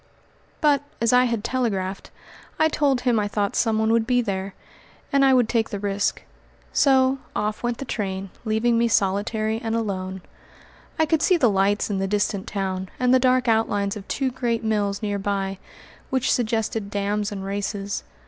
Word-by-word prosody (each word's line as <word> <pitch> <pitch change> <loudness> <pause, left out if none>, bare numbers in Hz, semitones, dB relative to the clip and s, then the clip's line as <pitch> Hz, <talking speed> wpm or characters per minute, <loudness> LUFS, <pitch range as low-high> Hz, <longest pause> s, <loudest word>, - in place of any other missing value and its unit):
But, 290 -2 +4 0.2
as 230 +1 +2
I 250 0 +6
had 230 -3 -1
telegraphed, 200 -7 -2 0.5
I 315 - +3
told 280 -4 +1
him 245 -3 +2
I 205 - 0
thought 205 -1 -1
someone 220 -1 +2
would 230 0 +2
be 250 -1 +3
there, 195 -4 -3 0.6
and 275 0 +4
I 270 - +6
would 245 -3 +3
take 225 -1 0
the 205 - -4
risk. 200 0 -1 0.5
So 265 -1 +4 0.2
off 210 0 -2
went 240 -1 -1
the 275 - -6
train, 195 -5 -4
leaving 230 +1 +1
me 235 - +3
solitary 215 +2 0
and 225 0 -2
alone. 190 -4 -3 0.7
I 320 - +3
could 315 0 +1
see 365 +1 +4
the 245 -9 +3
lights 200 +2 +1
in 195 - -1
the 195 - 0
distant 205 -1 -1
town 190 -2 -3
and 250 0 +3
the 260 - +6
dark 255 0 +2
outlines 205 -3 +1
of 205 -1 -9
two 270 -2 -1
great 235 -2 -1
mills 205 -1 -1
near 205 -1 -1
by, 195 -1 -2 0.5
which 260 -1 +1
suggested 225 -3 -1
dams 205 +1 -1
and 195 -2 -5
races. 200 0 -3
220 Hz, 175 wpm, -23 LUFS, 200-245 Hz, 0.7 s, I